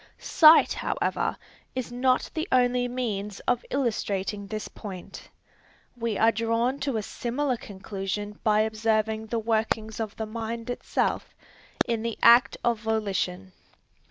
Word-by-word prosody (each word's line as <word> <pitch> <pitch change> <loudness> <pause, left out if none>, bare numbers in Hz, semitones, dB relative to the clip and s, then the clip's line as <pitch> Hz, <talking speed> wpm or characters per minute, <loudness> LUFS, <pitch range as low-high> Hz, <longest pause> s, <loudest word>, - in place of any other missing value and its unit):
Sight 315 0 +6
however - - -1 0.4
is 255 -2 -3
not 255 +1 +1
the 320 +2 -2
only 245 -1 +3
means 210 -5 -3
of 245 -1 0
illustrating 205 -6 -2
this 215 +1 -4
point. 190 -4 -9 0.7
We 230 -4 -2
are 225 +1 +5
drawn 230 +4 0
to 270 -4 -1
a 215 - -2
similar 255 +5 -2
conclusion 205 0 -5
by 215 -1 +4
observing 220 0 0
the 230 - -2
workings 220 -1 -1
of 220 -2 -4
the 220 - -3
mind 230 +2 -5
itself, - - -2 0.5
in 230 -2 -1
the 230 0 -3
act 235 +2 +7
of 235 -2 +1
volition. 200 -4 -2
225 Hz, 130 wpm, -26 LUFS, 210-245 Hz, 0.7 s, act